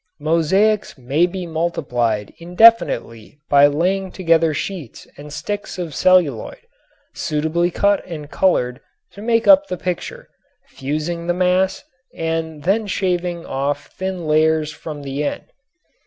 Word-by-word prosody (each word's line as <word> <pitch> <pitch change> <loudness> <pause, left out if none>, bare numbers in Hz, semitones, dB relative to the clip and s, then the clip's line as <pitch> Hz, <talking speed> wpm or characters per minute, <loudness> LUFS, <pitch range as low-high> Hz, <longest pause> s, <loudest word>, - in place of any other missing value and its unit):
Mosaics 170 +8 +1
may 140 +7 +1
be 180 0 -5
multiplied 125 -10 -2
indefinitely 170 - +3
by 145 0 +7
laying 185 +6 -1
together 165 -3 +2
sheets 155 - -6
and 150 +1 -11
sticks 205 +7 -5
of 170 -4 -5
celluloid, 170 -10 +2 0.6
suitably 160 +3 -1
cut 200 +3 +1
and 155 -4 -8
colored 125 -10 +1 0.3
to 200 - -12
make 230 +1 +1
up 295 0 +7
the 180 - -4
picture, 180 0 -5 0.4
fusing 155 +5 -4
the 175 - +1
mass, 185 +1 +1 0.3
and 160 -2 -3
then 205 +4 +1
shaving 180 -3 -2
off 140 +1 -3
thin 190 -2 -4
layers 155 0 +2
from 150 -1 -8
the 140 +1 -3
end. 145 - -3
165 Hz, 125 wpm, -20 LUFS, 150-185 Hz, 0.6 s, by